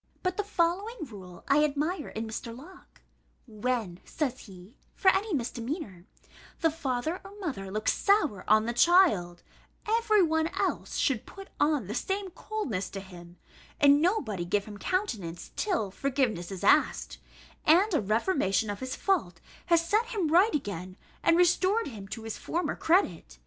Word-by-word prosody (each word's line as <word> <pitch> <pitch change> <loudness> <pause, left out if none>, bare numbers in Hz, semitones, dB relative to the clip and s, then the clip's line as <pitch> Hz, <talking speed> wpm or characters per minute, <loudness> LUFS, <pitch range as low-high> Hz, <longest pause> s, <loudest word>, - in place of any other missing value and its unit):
But 365 0 0
the 415 - -1
following 390 +2 -1
rule 190 -7 -12
I 295 +2 +4
admire 300 +3 -1
in 220 +1 -5
Mr. 230 +1 -6
Locke: 355 +8 -15 0.4
"When," 220 -5 -3
says 265 -5 -3
he 190 +4 -14 0.2
(for 380 - +4
any 400 +3 -1
misdemeanour), 240 - -4 0.6
"the 325 - +3
father 310 +2 -2
or 395 +1 -12
mother 260 - -4
looks 215 +2 0
sour 325 - +2
on 215 +1 +5
the 235 - -1
child, 240 - +4 0.4
every 435 -2 +3
one 320 -1 +1
else - - -1
should 255 -6 0
put 390 0 -11
on 290 -6 +2
the 205 - -5
same 385 - -2
coldness 330 - -4
to 195 - -6
him, 175 -2 -12 0.4
and 285 0 +6
nobody 285 - 0
give 195 +3 0
him 205 -1 -10
countenance 210 - -3
till 345 - -1
forgiveness 250 -8 -1
is 190 - -6
asked, - - +2 0.4
and 365 +7 +4
a 310 - +3
reformation 215 - +1
of 205 - -6
his 260 0 -4
fault 285 - 0 0.3
has 335 -1 +3
set 435 +5 +2
him 410 -10 -1
right 355 +3 +4
again, 185 - -4 0.2
and 335 - +4
restored 370 +5 +3
him 205 -6 -9
to 225 +2 -7
his 225 -1 -6
former 345 +2 -2
credit. 205 - +1
280 Hz, 160 wpm, -28 LUFS, -, 0.6 s, and